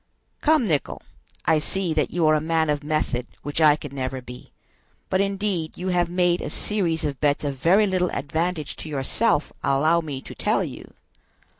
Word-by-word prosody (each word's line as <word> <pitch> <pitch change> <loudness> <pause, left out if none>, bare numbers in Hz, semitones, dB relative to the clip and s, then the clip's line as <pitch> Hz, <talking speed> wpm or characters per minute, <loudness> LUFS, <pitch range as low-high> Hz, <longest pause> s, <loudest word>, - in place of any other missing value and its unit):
"Come, 305 -6 +3
Nicholl. 150 -5 -1 0.4
I 160 -1 +4
see 180 +2 -1
that 155 -2 +1
you 170 -1 0
are 155 - +5
a 155 - +2
man 160 -1 +1
of 145 0 -2
method, 145 -5 -1 0.2
which 145 +2 -2
I 150 -2 +7
could 145 -2 -9
never 130 -1 -3
be; 125 0 -11 0.6
but 190 0 +3
indeed 195 -5 -1
you 185 +1 -3
have 175 -1 +1
made 175 0 +2
a - - -4
series 170 -7 0
of 140 -3 -3
bets 145 0 +2
of 140 -2 -2
very 185 +10 +4
little 185 -2 +1
advantage 160 +3 -2
to 160 - -7
yourself, 150 - 0
allow 155 +5 +3
me 145 -4 -5
to - - -10
tell - - +1
you." - - -9
160 Hz, 185 wpm, -24 LUFS, 145-180 Hz, 0.6 s, I